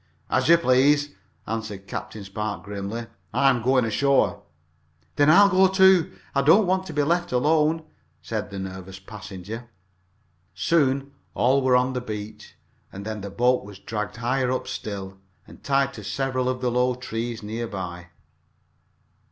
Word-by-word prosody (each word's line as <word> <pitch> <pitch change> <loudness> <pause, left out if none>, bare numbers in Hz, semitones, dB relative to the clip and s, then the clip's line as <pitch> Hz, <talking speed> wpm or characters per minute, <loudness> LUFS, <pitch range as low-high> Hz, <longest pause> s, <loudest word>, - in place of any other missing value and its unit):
"As - - +2
you 170 - +8
please," 145 0 +3 0.3
answered 110 -3 -5
Captain 105 +1 -6
Spark, 105 +2 -4
grimly. 100 +3 -5 0.3
"I 135 +1 +5
am 120 -2 -1
going 130 +1 +3
ashore." 130 -1 +2 0.7
"Then 145 +1 +4
I'll 200 +5 +8
go, 190 -1 +5
too 190 -2 +4 0.2
I 140 - +2
don't 165 +10 +5
want 190 +1 0
to 160 - -7
be 145 -1 +1
left 175 +3 0
alone," 155 +5 +2 0.4
said 105 -2 -4
the 100 - -7
nervous 95 0 -7
passenger. 105 +3 -9 0.9
Soon 135 - +1 0.2
all 135 +3 +3
were 130 -1 +3
on 125 +1 +2
the 125 - -2
beach, 105 -2 -8 0.4
and 100 +1 -8
then 110 -1 -4
the 100 - -6
boat 125 +6 +2
was 100 -1 -11
dragged 105 +1 -5
higher 125 +2 0
up 130 - -2
still, 95 -2 -6 0.3
and - - -16
tied 135 -1 +1
to - - -9
several 130 -2 -1
of 130 0 -3
the 125 -1 0
low 125 +1 +2
trees 115 -2 -5
near 115 +3 -4
by. 90 -4 -6
125 Hz, 160 wpm, -24 LUFS, 105-140 Hz, 0.9 s, you